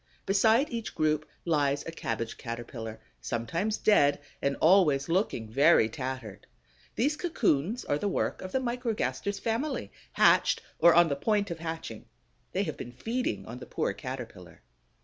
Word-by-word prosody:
Beside 220 +8 +3
each 230 -3 -4
group 155 -1 0 0.2
lies 145 -4 +1
a 165 - -5
Cabbage 115 -7 -4
caterpillar, 115 -2 -6 0.2
sometimes 165 - -2
dead 145 -9 +4 0.2
and 140 0 +1
always 155 -6 +4
looking 165 - 0
very 135 +1 +5
tattered. 130 -4 -6 0.5
These 285 +6 +1
cocoons 240 - 0
are 145 - 0
the 205 - -1
work 200 - -1
of 185 - -6
the - - +1
Microgaster's 225 - -2
family, 250 +6 -2 0.2
hatched - - +4 0.2
or 170 -1 +7
on 170 0 +7
the 140 - 0
point 205 +5 0
of 165 - -5
hatching; 160 -9 -6 0.5
they 195 - 0
have 155 -6 -4
been 120 - -8
feeding 230 - -2
on 120 +3 -8
the - - -10
poor - - -1
Caterpillar. - - -8
165 Hz, 150 wpm, -29 LUFS, 130-210 Hz, 0.5 s, or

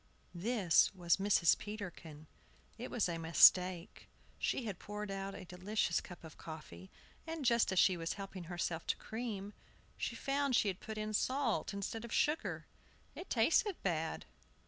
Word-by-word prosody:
THIS 190 -1 +3
was 175 -2 +2
Mrs. 195 -4 +4
Peterkin. 175 -7 -8 0.5
It 240 +3 -7
was 225 - 0
a 170 -1 -3
mistake. 170 +2 +4 0.3
She 255 - -1
had 200 -5 -5
poured 210 0 -6
out 195 0 -4
a 195 - -8
delicious 180 0 -1
cup 180 - -12
of 160 -2 -12
coffee, 125 - -9 0.4
and, 320 -3 -4
just 235 -3 +3
as 190 - -2
she 185 0 +5
was 165 0 -2
helping 195 -3 -7
herself 170 -1 -3
to - - +1
cream, 215 -3 -5 0.4
she - - -3
found 275 -1 0
she 210 - +3
had 185 - -4
put 220 -1 -7
in 215 0 -3
salt 255 +1 0
instead 200 +3 -4
of 235 - -8
sugar! 300 +2 0 0.5
It 365 - -9
tasted 330 - +2
bad. 160 -3 -1
195 Hz, 160 wpm, -35 LUFS, 175-225 Hz, 0.5 s, she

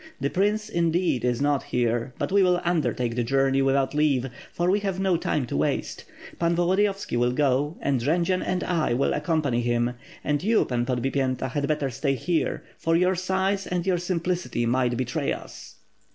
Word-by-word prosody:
The 140 +2 -1
prince, 210 +3 +1
indeed, 170 - 0
is 125 +1 0
not 145 -1 +2
here, 120 +1 -1
but - - -2
we 200 0 +4
will 180 -1 +3
undertake 145 -8 0
the 120 - 0
journey 135 +2 +2
without 135 0 +1
leave; 140 -4 +1 0.2
for 175 - -1
we 205 - +2
have 195 -2 -3
no 190 -2 +2
time 150 -4 -1
to - - -5
waste. 75 +2 -1 0.3
Pan 170 0 +2
Volodiyovski 195 0 +1
will 120 +1 +2
go, 145 +2 +1
and 135 -4 0
Jendzian 170 +7 +1
and 180 0 -1
I 160 -9 0
will 135 - +1
accompany 150 -5 0
him; 120 0 0 0.3
and 145 -1 0
you. 220 +4 +3
Pan 120 -1 -1
Podbipyenta 130 0 -1
had 140 +1 -1
better 150 -3 -1
stay 135 +2 -1
here, 165 +6 -1 0.2
for 165 0 +1
your 180 +2 +3
size 190 +2 -1
and 180 -1 -2
your 185 -2 +1
simplicity 175 -8 -2
might 120 0 +1
betray 120 -1 -1
us." - - -10
150 Hz, 180 wpm, -25 LUFS, 125-180 Hz, 0.3 s, we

